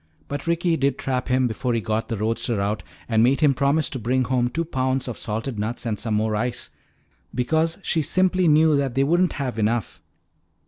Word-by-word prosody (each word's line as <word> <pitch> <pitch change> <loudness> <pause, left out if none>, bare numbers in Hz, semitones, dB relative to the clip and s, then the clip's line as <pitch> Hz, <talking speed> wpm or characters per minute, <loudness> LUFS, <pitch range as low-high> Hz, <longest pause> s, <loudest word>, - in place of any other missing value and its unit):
But 145 +2 -5
Ricky 170 0 +1
did 135 -2 +1
trap 130 -1 -2
him 130 0 +2
before 120 +2 -2
he - - +1
got 110 +1 -2
the 115 - -2
roadster 115 +1 -1
out 100 +2 -1 0.3
and 110 -2 +2
made 130 +6 +3
him 145 -3 +5
promise 140 +4 +1
to 130 - -4
bring 125 +3 +1
home 125 -1 +1
two 165 +5 -2
pounds 130 -3 -1
of 120 - -4
salted 110 +2 -4
nuts 115 +3 -3
and 110 -3 -2
some 110 -2 -1
more 110 0 0
ice, 120 +3 -2 0.6
because 160 +7 +1
she 165 - +1
simply 185 +3 +2
knew 155 0 +5
that 135 -3 -1
they 135 - +3
wouldn't 175 +5 +2
have 125 -6 -3
enough. 110 +1 -1
130 Hz, 200 wpm, -23 LUFS, 115-150 Hz, 0.6 s, him